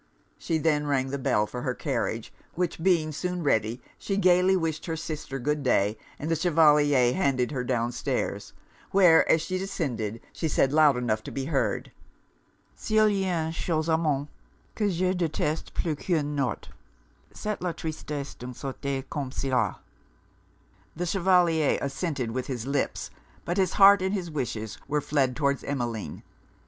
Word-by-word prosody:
She 165 - -1
then 150 -2 +1
rang 135 -2 +1
the 140 - -2
bell 105 -4 +2
for 125 +3 -6
her 130 -2 -2
carriage; 115 -5 -3 0.2
which 175 -2 -2
being 165 -4 +2
soon 180 +3 -3
ready, 115 -3 0 0.2
she 195 - -2
gaily 185 0 +4
wished 160 -2 -2
her 165 - -1
sister 155 -3 -5
good 150 +3 -1
day, 105 -5 +2 0.2
and 155 +3 -4
the - - +3
Chevalier 150 -6 +4
handed 135 -9 +1
her 130 -4 -2
down 120 -1 0
stairs; 125 - -3 0.4
where, 180 -4 +5
as 160 - +3
she 185 +2 -2
descended, 120 - -3
she 160 - -2
said, 140 -2 +2
loud 150 -4 +5
enough 110 -3 0
to - - -8
be 135 -1 -3
heard, 140 -3 -1 0.8
'S'il 215 -1 +2
y'a 185 -5 0
une 160 - -3
chose 160 -1 -1
au 160 - +4
monde 145 -3 0 0.5
que 210 -2 0
je 185 0 +1
deteste 160 -3 -2
plus 165 - 0
qu'un 150 -2 -1
notre, 135 -7 -2 0.6
c'est 210 0 -4
la 180 -1 -1
tristesse 150 -3 -5
d'une 125 0 -8
societé 135 0 -4
comme 140 -3 -4
cela.' 125 -7 -1 1.1
The 175 - -2
Chevalier 175 -4 +3
assented 140 -3 -2
with 125 +2 -3
his 125 -4 -4
lips; 140 0 -2 0.3
but 175 +2 -2
his 190 -2 +2
heart 200 -1 +7
and 190 +2 0
his 175 -4 -4
wishes 115 -7 -4
were 150 +1 +1
fled 135 -3 0
towards 140 -2 0
Emmeline. 120 -6 -4
150 Hz, 160 wpm, -27 LUFS, 130-175 Hz, 1.1 s, heart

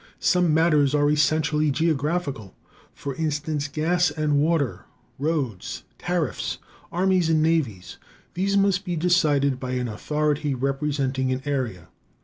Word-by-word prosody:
Some 180 -3 +2
matters 150 -3 +3
are 145 0 +3
essentially 150 0 +2
geographical; 145 - -1 0.4
for 140 - -6
instance, 150 -1 -2
gas 170 +4 +1
and 150 -2 0
water, 150 -4 0 0.3
roads, 140 - -2 0.2
tariffs, 175 -6 -2 0.3
armies 185 -1 +2
and 155 -1 +3
navies. 115 - -1 0.3
These 200 +3 +1
must 195 -1 +2
be 180 -3 -3
decided 150 -6 +2
by 130 -1 -4
an 125 -1 -1
authority 150 +5 -1
representing 135 0 -1
an 130 +1 -2
area. 125 - -3
150 Hz, 125 wpm, -24 LUFS, 135-165 Hz, 0.4 s, matters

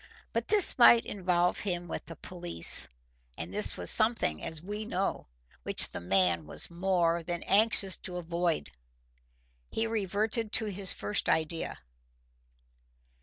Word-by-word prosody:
But - - -3
this 415 -10 +4
might 235 -1 +6
involve 180 -3 -1
him 175 -3 -4
with - - -7
the 165 - -10
police, 175 - +4 0.5
and 85 +3 -7
this 100 0 -2
was 90 -1 0
something, 215 - +1
as 160 - -5
we 205 +6 -6
know, 195 - -4 0.3
which - - +1
he - - -5 0.5
was 75 - -4
more 170 -1 0
than 175 +1 -5
anxious 200 -2 +2
to 180 -1 -6
avoid. 170 - -3 1.0
He 225 - -2
reverted 215 +1 -2
to 220 - +5
his 195 -2 0
first 105 0 -1
idea. 160 +1 -2
180 Hz, 130 wpm, -29 LUFS, 165-210 Hz, 1.0 s, might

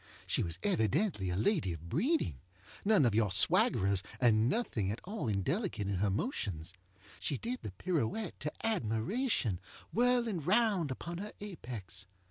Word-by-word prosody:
She - - +1
was 85 -1 -1
evidently 110 - +1
a 90 - -1
lady 120 - +2
of 85 +1 -9
breeding. 225 - +1 0.4
None 200 -8 +5
of 115 - +3
your 105 -1 +3
swaggerers, 100 - +4 0.2
and 115 -2 +4
nothing 120 - 0
at 105 - -2
all 200 - -4
indelicate 110 - 0
in 100 -2 0
her 100 +2 +2
motions. 95 - -2 0.5
She 140 - -1
did 245 - -3
the 100 - -6
pirouette 175 - -2
to 150 - -2
admirationŌĆöwhirling 215 - 0
round 195 -3 +3
upon 170 +6 -5
her 210 +2 -6
apex. 115 - -6
130 Hz, 140 wpm, -33 LUFS, -, 0.5 s, None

